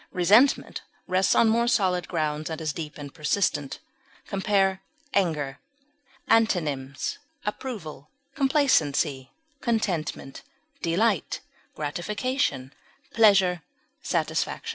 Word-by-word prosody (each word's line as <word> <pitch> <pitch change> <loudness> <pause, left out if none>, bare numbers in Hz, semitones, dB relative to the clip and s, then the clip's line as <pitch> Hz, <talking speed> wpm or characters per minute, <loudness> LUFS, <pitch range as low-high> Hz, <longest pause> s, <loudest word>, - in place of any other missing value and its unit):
Resentment 210 +10 +3 0.2
rests 185 +1 +2
on 230 - +5
more 235 +2 +2
solid 185 -6 +1
grounds, 155 -2 -2
and 160 - -4
is 155 -2 -2
deep 155 -3 -6
and 145 -2 -8
persistent. 150 -2 -1 0.5
Compare 195 -1 +1 0.3
ANGER. 150 -8 0 0.7
Antonyms: 150 -11 0 0.3
approval, 190 - -6 0.2
contentment, 160 - +2 2.5
gratification, 175 - -2 0.4
pleasure, 195 -6 +4 0.4
satisfaction. - - -1
180 Hz, 75 wpm, -26 LUFS, 150-210 Hz, 2.5 s, on